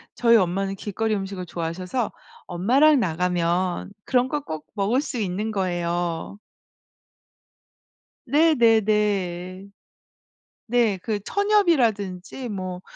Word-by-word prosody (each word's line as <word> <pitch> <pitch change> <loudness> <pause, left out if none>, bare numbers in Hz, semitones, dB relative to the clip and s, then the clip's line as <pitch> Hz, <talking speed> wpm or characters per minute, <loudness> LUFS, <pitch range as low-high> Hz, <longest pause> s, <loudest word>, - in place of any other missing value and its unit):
저희 235 -1 +4
엄마는 195 +1 0
길거리 215 +2 -2
음식을 195 -2 -5
좋아하셔서 180 +8 -3 0.3
엄마랑 260 - +4
나가면 180 0 -1
그런 250 -1 +2
걸 295 +2 -2
꼭 155 - -7
먹을 215 +7 +1
수 275 -4 -5
있는 205 +1 -2
거예요. 175 -1 -2 1.9
네네네. 210 - +2 1.0
네. 230 -4 +2
그 215 -3 -1
천엽이라든지 250 - +1
뭐 185 -3 -5
200 Hz, 215 characters per minute, -24 LUFS, 180-235 Hz, 1.9 s, 저희